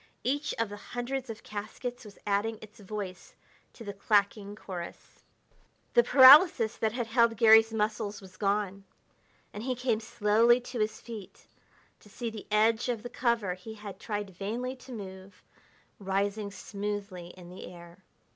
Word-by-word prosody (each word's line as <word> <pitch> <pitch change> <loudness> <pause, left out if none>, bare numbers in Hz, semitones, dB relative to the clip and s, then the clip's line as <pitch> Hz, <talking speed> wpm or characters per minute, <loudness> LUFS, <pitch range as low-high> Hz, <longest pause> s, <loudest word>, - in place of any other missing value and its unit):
Each 285 +3 -1
of 230 -2 0
the 205 - -7
hundreds 245 +4 -5
of 225 -1 -7
caskets 215 +4 -6
was 205 -2 -13
adding 210 +2 0
its 215 +1 -14
voice 200 -2 -7 0.4
to 230 - -11
the 200 -2 -6
clacking 200 0 +1
chorus. 180 -5 -9 0.7
The 480 - +7
paralysis 270 - +8
that 220 - 0
had 240 -1 -2
held 230 -1 +2
Garry's 225 0 +7
muscles 210 -1 -2
was 190 -2 -14
gone, 200 0 -1 0.7
and 205 - -6
he 255 +2 -2
came 245 -3 0
slowly 225 +2 +3
to 245 0 -6
his 215 0 -1
feet 215 -5 -10 0.5
to 210 - -19
see 230 +2 -5
the 215 -2 -9
edge 220 +3 +2
of 235 -3 -2
the 245 - -6
cover 235 -8 0
he 200 +5 -10
had 210 -2 -9
tried 205 -3 -4
vainly 230 +8 -4
to 255 +1 -13
move, 190 -3 -9 0.6
rising 200 +1 -1
smoothly 200 -3 -5
in 175 -1 -12
the 185 - -9
air. 170 0 -13
215 Hz, 155 wpm, -29 LUFS, 200-235 Hz, 0.7 s, paralysis